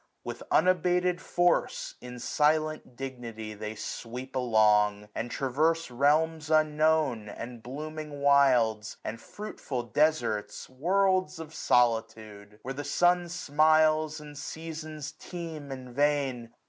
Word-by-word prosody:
With -, -, -6 dB
unabated 180 Hz, 0 st, +2 dB
force, 175 Hz, 0 st, +1 dB
845 125 Hz, -, -8 dB
In 125 Hz, -, -8 dB
silent 155 Hz, +1 st, 0 dB
dignity 120 Hz, -5 st, -6 dB
they 105 Hz, +1 st, -6 dB
sweep 125 Hz, +4 st, -6 dB
along; 105 Hz, -4 st, +3 dB
And 120 Hz, -, -3 dB
traverse 155 Hz, +5 st, 0 dB
realms 155 Hz, +4 st, +2 dB
unknown, 155 Hz, -7 st, +2 dB
and 120 Hz, +2 st, -8 dB
blooming 150 Hz, +4 st, -7 dB
wilds> 125 Hz, -7 st, +3 dB
And 115 Hz, +1 st, -5 dB
fruitful 145 Hz, -, -6 dB
desarts, 135 Hz, -4 st, 0 dB
worlds 185 Hz, +7 st, +1 dB
of 160 Hz, -1 st, -9 dB
solitude! 110 Hz, -6 st, 0 dB
Where 135 Hz, -, -4 dB
the 145 Hz, +2 st, -5 dB
sun 175 Hz, +1 st, +2 dB
smiles 155 Hz, -1 st, +3 dB
and 150 Hz, -1 st, -11 dB
seasons 155 Hz, 0 st, -6 dB
teem 160 Hz, -5 st, -8 dB
in 130 Hz, -2 st, -8 dB
vain. 135 Hz, -4 st, 0 dB
145 Hz, 115 wpm, -29 LUFS, 120-155 Hz, -, along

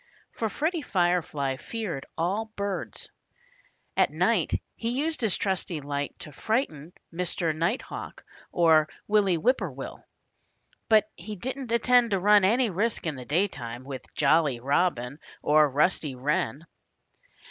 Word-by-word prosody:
For 225 Hz, -, -2 dB
Freddie 315 Hz, -, -1 dB
Firefly 175 Hz, -, 0 dB
feared 190 Hz, -, -5 dB
all 190 Hz, +7 st, 0 dB
birds. 200 Hz, -1 st, -4 dB, 0.8 s
At -, -, +4 dB
night -, -, +1 dB, 0.2 s
he 230 Hz, -, -3 dB
used 315 Hz, 0 st, -1 dB
his 220 Hz, -5 st, +1 dB
trusty 185 Hz, -4 st, -1 dB
light 145 Hz, 0 st, -4 dB
to 150 Hz, -, -7 dB
frighten 170 Hz, -, -2 dB, 0.2 s
Mr. 170 Hz, -2 st, -1 dB
Nighthawk 170 Hz, +10 st, -3 dB, 0.3 s
or 160 Hz, -3 st, +4 dB, 0.2 s
Willie 205 Hz, -4 st, +3 dB
Whip 250 Hz, +11 st, +2 dB
poor -, -, -3 dB
will. -, -, -8 dB, 0.9 s
But 215 Hz, -2 st, +5 dB
he 210 Hz, +5 st, -7 dB
didn't 255 Hz, +4 st, -4 dB
intend 240 Hz, +1 st, +4 dB
to 195 Hz, -2 st, +1 dB
run 205 Hz, +1 st, +5 dB
any 230 Hz, +3 st, +3 dB
risk 210 Hz, +4 st, -1 dB
in 160 Hz, -, -1 dB
the 125 Hz, -1 st, -8 dB
daytime, 130 Hz, -7 st, -1 dB
with 135 Hz, -1 st, -8 dB
Jolly 145 Hz, -3 st, +3 dB
Robin 140 Hz, -1 st, 0 dB, 0.2 s
or 150 Hz, 0 st, +5 dB
Rusty 150 Hz, 0 st, +1 dB
Wren. 140 Hz, +2 st, -1 dB
175 Hz, 135 wpm, -27 LUFS, 150-215 Hz, 0.9 s, But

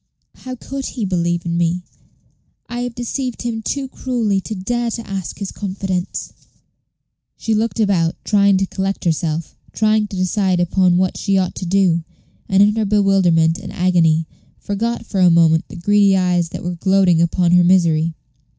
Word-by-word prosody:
How 255 Hz, 0 st, -8 dB
could 270 Hz, +2 st, -6 dB
he 230 Hz, -5 st, -4 dB
believe 175 Hz, -2 st, -1 dB
in 170 Hz, 0 st, -1 dB
me? 175 Hz, +1 st, 0 dB, 0.8 s
I 240 Hz, -, -5 dB
have 245 Hz, -1 st, -4 dB
deceived 250 Hz, +1 st, -4 dB
him 230 Hz, -2 st, -3 dB
too 275 Hz, +4 st, -3 dB
cruelly 235 Hz, -7 st, -1 dB
to 215 Hz, -, -6 dB
dare 240 Hz, +5 st, -2 dB
to 230 Hz, 0 st, -6 dB
ask 195 Hz, -4 st, -5 dB
his 200 Hz, -2 st, -5 dB
confidence." 190 Hz, -2 st, -4 dB, 1.0 s
She 225 Hz, -, -2 dB
looked 225 Hz, +2 st, -1 dB
about, 185 Hz, -6 st, +1 dB
trying 200 Hz, -2 st, +3 dB
to 195 Hz, -, +1 dB
collect 195 Hz, +1 st, -3 dB
herself, 160 Hz, -1 st, -2 dB, 0.2 s
trying 215 Hz, -1 st, +2 dB
to 195 Hz, -, -7 dB
decide 185 Hz, 0 st, 0 dB
upon 175 Hz, 0 st, +2 dB
what 185 Hz, 0 st, 0 dB
she 195 Hz, -2 st, 0 dB
ought 185 Hz, -1 st, 0 dB
to 185 Hz, -, -6 dB
do, 175 Hz, -3 st, +2 dB, 0.5 s
and 195 Hz, +1 st, +5 dB
in 210 Hz, +1 st, +3 dB
her 220 Hz, -, +1 dB
bewilderment 190 Hz, -5 st, +2 dB
and 205 Hz, -, -8 dB
agony 165 Hz, -3 st, +2 dB, 0.3 s
forgot 230 Hz, +4 st, -3 dB
for 200 Hz, -, -3 dB
a 180 Hz, -1 st, +6 dB
moment 165 Hz, -1 st, +3 dB
the -, -, -12 dB
greedy 200 Hz, +2 st, +3 dB
eyes 180 Hz, -2 st, +1 dB
which -, -, -7 dB
were 175 Hz, -, -2 dB
gloating 185 Hz, -1 st, +2 dB
upon 170 Hz, +1 st, +1 dB
her 180 Hz, 0 st, +5 dB
misery. 165 Hz, -3 st, +2 dB
190 Hz, 170 wpm, -18 LUFS, 175-210 Hz, 1.0 s, a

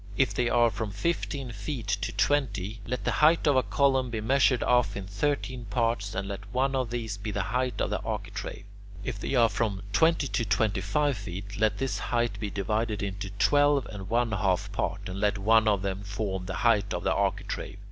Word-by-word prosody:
If 130 Hz, -6 st, +3 dB
they 120 Hz, +2 st, +1 dB
are 120 Hz, 0 st, +4 dB
from 110 Hz, 0 st, -3 dB
fifteen 135 Hz, -, -2 dB
feet 110 Hz, +3 st, -5 dB
to 100 Hz, 0 st, -1 dB
twenty, 110 Hz, -7 st, 0 dB
let 125 Hz, -, -3 dB
the -, -, +1 dB
height 160 Hz, +3 st, +5 dB
of 145 Hz, -2 st, +4 dB
a 130 Hz, -, +5 dB
column 135 Hz, -2 st, +2 dB
be 115 Hz, -2 st, -3 dB
measured 130 Hz, +2 st, +3 dB
off 120 Hz, -5 st, +2 dB
into 100 Hz, 0 st, -7 dB
thirteen 130 Hz, +1 st, -1 dB
parts, 110 Hz, -2 st, -1 dB
and 95 Hz, +1 st, -2 dB
let 100 Hz, +1 st, -7 dB
one 135 Hz, +3 st, +1 dB
of 130 Hz, -3 st, 0 dB
these 115 Hz, -3 st, -3 dB
be 105 Hz, +2 st, -5 dB
the 100 Hz, -2 st, -1 dB
height 125 Hz, +5 st, -1 dB
of -, -, 0 dB
the -, -, 0 dB
architrave. -, -, -5 dB, 0.4 s
If -, -, -4 dB
they -, -, -2 dB
are 120 Hz, -2 st, +6 dB
from 100 Hz, -2 st, -2 dB
twenty 160 Hz, +1 st, +3 dB
to 120 Hz, -, -1 dB
twenty 105 Hz, -1 st, +1 dB
five 140 Hz, +7 st, +1 dB
feet, 100 Hz, 0 st, -7 dB
let 110 Hz, -1 st, +2 dB
this 135 Hz, -1 st, -2 dB
height 120 Hz, -1 st, -1 dB
be 105 Hz, -, -3 dB
divided 105 Hz, +2 st, -1 dB
into 100 Hz, 0 st, -4 dB
twelve 145 Hz, 0 st, +4 dB
and 100 Hz, -2 st, -7 dB
one 120 Hz, 0 st, +1 dB
half 100 Hz, 0 st, 0 dB
parts, 95 Hz, 0 st, -2 dB
and 95 Hz, +1 st, -5 dB
let 105 Hz, 0 st, +1 dB
one 110 Hz, +3 st, +4 dB
of 100 Hz, -3 st, +2 dB
them 95 Hz, 0 st, -2 dB
form 100 Hz, -2 st, -3 dB
the 95 Hz, -, -3 dB
height 115 Hz, -4 st, +3 dB
of -, -, -4 dB
the -, -, +2 dB
architrave. -, -, -2 dB
110 Hz, 210 wpm, -28 LUFS, 100-125 Hz, 0.4 s, are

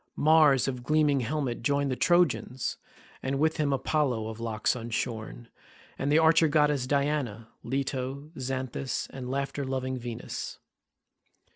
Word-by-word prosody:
Mars 150 Hz, -4 st, +5 dB
of 125 Hz, -2 st, -3 dB
gleaming 150 Hz, +1 st, +3 dB
helmet 130 Hz, 0 st, -2 dB
joined 140 Hz, +2 st, +1 dB
the -, -, 0 dB
Trojans, 160 Hz, -6 st, +1 dB, 0.4 s
and 135 Hz, +1 st, -1 dB
with 160 Hz, +2 st, +1 dB
him 150 Hz, -2 st, +1 dB
Apollo 130 Hz, -5 st, 0 dB
of 110 Hz, 0 st, -8 dB
locks 115 Hz, -1 st, 0 dB
unshorn, 115 Hz, 0 st, -4 dB, 0.5 s
and 140 Hz, +1 st, -1 dB
the 150 Hz, -, +5 dB
archer 160 Hz, 0 st, +5 dB
goddess 150 Hz, -3 st, +2 dB
Diana, 140 Hz, -6 st, -1 dB
Leto, 135 Hz, +3 st, -3 dB
Xanthus, 130 Hz, -1 st, -3 dB
and 125 Hz, -2 st, -6 dB
laughter 140 Hz, +1 st, -2 dB
loving 130 Hz, -1 st, -2 dB
Venus. 120 Hz, -1 st, -6 dB
135 Hz, 130 wpm, -28 LUFS, 125-145 Hz, 0.5 s, Mars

